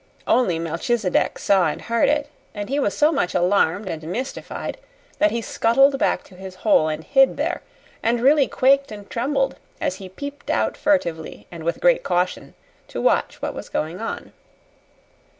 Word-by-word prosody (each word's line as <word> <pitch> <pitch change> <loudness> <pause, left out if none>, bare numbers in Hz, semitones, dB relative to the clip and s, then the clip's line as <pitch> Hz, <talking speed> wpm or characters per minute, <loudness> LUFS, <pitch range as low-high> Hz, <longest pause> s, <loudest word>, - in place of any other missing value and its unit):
Only 185 -10 +2
Melchisedec 180 +5 0
saw 190 -4 +3
and 150 - -3
heard 235 0 +1
it; 295 -1 +1 0.3
and 205 +1 -5
he 280 +2 0
was 205 -8 0
so 300 +2 +4
much 225 - -1
alarmed 185 +1 +2
and 160 -3 -4
mystified 220 +12 -5 0.4
that 315 - +5
he 235 -4 -3
scuttled 270 +6 +3
back - - +1
to 190 - -17
his 190 0 -9
hole 180 -7 +5
and 155 0 -3
hid 270 - +4
there, - - -1 0.4
and 235 +1 +1
really 275 +3 +4
quaked 275 0 +3
and 205 -1 -9
trembled 270 +2 0 0.2
as 185 - -2
he 190 -1 -9
peeped 285 +8 -8
out 110 0 +1
furtively 175 - -1
and 170 -2 -8
with 170 +1 -1
great - - +4
caution 180 - -1 0.3
to - - -6
watch - - +1
what - - -2
was - - -8
going 165 +6 -3
on. 225 - -5
220 Hz, 170 wpm, -22 LUFS, 180-275 Hz, 0.4 s, that